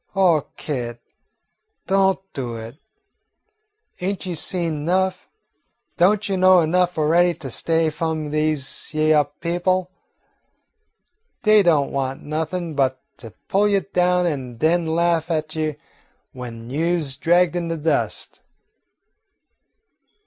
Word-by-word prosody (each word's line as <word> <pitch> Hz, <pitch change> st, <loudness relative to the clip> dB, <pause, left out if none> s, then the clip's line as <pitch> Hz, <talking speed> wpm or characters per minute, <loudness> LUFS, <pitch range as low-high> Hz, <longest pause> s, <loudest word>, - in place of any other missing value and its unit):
Oh, 175 Hz, -6 st, +3 dB
Kit, 120 Hz, -5 st, -4 dB, 0.9 s
don't 195 Hz, 0 st, +3 dB, 0.2 s
do 125 Hz, -4 st, -4 dB
it. 115 Hz, +4 st, -8 dB, 1.2 s
Ain't 190 Hz, +2 st, -3 dB
you 180 Hz, -2 st, -3 dB
seen 170 Hz, 0 st, -1 dB
enough? 185 Hz, +5 st, 0 dB, 0.7 s
Don't 200 Hz, +4 st, +3 dB
you 195 Hz, -1 st, -1 dB
know 185 Hz, -1 st, +6 dB
enough 180 Hz, +2 st, +1 dB
already 170 Hz, +3 st, +3 dB
to 135 Hz, -4 st, -7 dB
stay 165 Hz, +7 st, 0 dB
away 160 Hz, -, +1 dB
f'om 155 Hz, -1 st, -3 dB
dese 155 Hz, -2 st, -1 dB
hyeah 155 Hz, -1 st, +3 dB, 0.2 s
people? 180 Hz, +2 st, 0 dB, 1.5 s
Dey 215 Hz, -1 st, +6 dB
don't 155 Hz, -7 st, +2 dB
want 135 Hz, -1 st, -3 dB
nothin' 160 Hz, +2 st, -3 dB
but 130 Hz, -2 st, +1 dB, 0.2 s
to 115 Hz, -, -10 dB, 0.2 s
pull 205 Hz, +2 st, +3 dB
you 200 Hz, -1 st, +2 dB
down 180 Hz, -2 st, +1 dB
an' 135 Hz, -7 st, -3 dB
den 165 Hz, +5 st, +2 dB
laugh 170 Hz, 0 st, +1 dB
at 155 Hz, -1 st, -2 dB
you 155 Hz, -2 st, -2 dB, 0.6 s
w'en 120 Hz, -2 st, -8 dB
you 170 Hz, +5 st, +1 dB
's 140 Hz, -4 st, -3 dB
dragged 175 Hz, +2 st, +2 dB
in 175 Hz, -1 st, -2 dB
de 165 Hz, 0 st, -2 dB
dust." 160 Hz, +1 st, -1 dB
165 Hz, 125 wpm, -22 LUFS, 150-180 Hz, 1.5 s, know